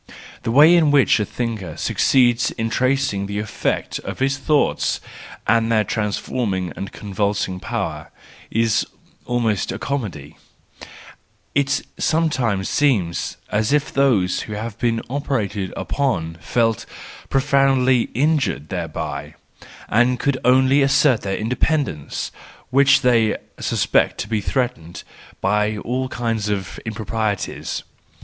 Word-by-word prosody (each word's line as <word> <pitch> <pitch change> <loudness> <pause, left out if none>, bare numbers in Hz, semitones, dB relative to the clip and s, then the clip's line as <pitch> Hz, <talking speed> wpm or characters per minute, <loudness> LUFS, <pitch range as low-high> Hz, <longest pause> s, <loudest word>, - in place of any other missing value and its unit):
The - - -3
way 150 +7 +7
in 160 -3 +4
which 140 -6 +4
a 105 - 0
thinker 115 -7 -4
succeeds 120 -3 +3
in 115 -1 -3
tracing 130 -7 +1
the 100 0 -4
effect 105 0 -2
of - - -6
his 135 +1 +1
thoughts, 145 +2 +1 0.5
and 115 0 +2
their 110 -2 +3
trans¬ 105 -2 -1
forming 95 -8 -2
and 100 - -6
convulsing 100 -2 -2
power, 75 -4 -4 0.4
is 115 -1 +2 0.4
almost 115 -4 0
a - - -4
comedy: 100 - -4 1.2
it 140 0 +1 0.2
sometimes 130 - +1
seems 105 -13 0
as 105 +3 +1
if 150 0 +1
those 120 -10 +2
who 105 - -5
have 110 +1 -5
been 115 -2 0
operated 110 -8 -2
upon 85 - -1
felt 115 -3 0 0.4
profoundly 135 -2 +3
injured 140 - +1
thereby, 75 -4 -4 0.5
and 120 +2 +2
could 140 -3 0
only 130 +2 +4
assert 135 -2 +4
their 95 -1 -2
independence, 125 - -1 0.4
which 140 +1 +5
they 115 -4 +3 0.2
suspect - - +1
to - - -4
be 110 -1 -1
threatened, 120 - -3 0.4
by 105 +1 +1
all 130 +5 -2
kinds 115 -4 -2
of 100 -3 -3
impro¬ 110 0 -5
prieties. 110 -3 -2
115 Hz, 125 wpm, -21 LUFS, 100-135 Hz, 1.2 s, way